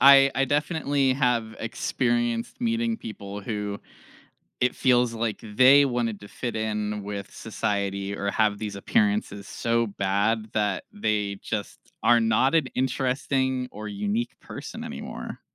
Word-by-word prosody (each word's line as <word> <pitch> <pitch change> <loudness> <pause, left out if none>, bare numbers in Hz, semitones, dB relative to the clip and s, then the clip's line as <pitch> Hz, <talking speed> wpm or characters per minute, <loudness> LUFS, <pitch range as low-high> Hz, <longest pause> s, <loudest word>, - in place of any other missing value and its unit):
I 135 0 +8
I 135 - +3
definitely 145 -2 +1
have 120 -4 +1
experienced 120 - -1
meeting 230 -1 0
people 100 - -7
who 105 -2 -3 0.8
it 125 0 +2
feels 125 -2 +3
like 115 -1 -2
they 130 +6 +6
wanted 120 -5 -1
to 100 - -11
fit 120 +2 -4
in 105 -1 -2
with 100 -1 -6
society, 100 -1 -2
or 100 0 -1
have 105 -1 +2
these 105 -2 -4
appearances 205 - 0
so 115 0 0
bad 100 +3 0
that 105 -3 0
they 105 - -1
just 105 -2 -4 0.3
are 120 +1 +6
not 115 +5 +3
an 160 -4 +4
interesting, 130 0 0
or 105 +1 -6
unique 105 +3 -2
person - - -8
anymore. - - -7
115 Hz, 135 wpm, -26 LUFS, 105-130 Hz, 0.8 s, I